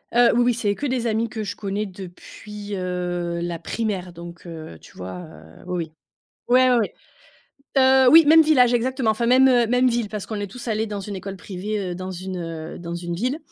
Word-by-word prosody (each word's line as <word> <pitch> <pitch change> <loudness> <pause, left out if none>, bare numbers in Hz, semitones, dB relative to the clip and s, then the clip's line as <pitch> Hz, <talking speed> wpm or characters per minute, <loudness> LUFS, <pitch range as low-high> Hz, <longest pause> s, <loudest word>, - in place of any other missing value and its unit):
Heu, 240 0 +6
oui 240 - +4
oui, 245 - +3
c'est 220 -3 0
que 290 - -4
des 250 -2 -1
amis 225 0 0
que 220 -1 -5
je 205 0 -5
connais 205 +1 -3
depuis, 205 +2 -9
heu, 175 -2 -3
la 170 -1 -3
primaire, 190 -2 -3
donc, 170 0 -11
heu, 160 - -9
tu - - -17
vois? 90 0 -7
Heu, 80 -2 -13
oui 180 - -3
oui. - - -26 0.6
Ouais, 255 +1 +5
ouais, 250 - +4
ouais. 225 -4 0 0.8
Heu, 260 -1 +6
oui. 325 +1 +8
Même 320 +2 +8
village, 255 -6 +4
exactement. 250 0 0
Enfin, 220 +2 -2
même, 260 +2 +6
heu, 245 -2 +4
même 250 +2 +3
ville 235 -3 -1
parce 210 -2 -5
qu'on 220 - -5
est 205 - -3
tous 240 +5 -9
allés 220 0 0
dans 205 -2 -5
une 200 0 -6
école 195 +1 -6
privée, 190 +1 -4
heu, - - -4
dans 185 +1 -6
une, 185 +1 -6
heu, 165 -2 -6
dans 170 0 -6
une 175 0 -4
ville 250 - -1
205 Hz, 220 wpm, -23 LUFS, 180-240 Hz, 0.8 s, oui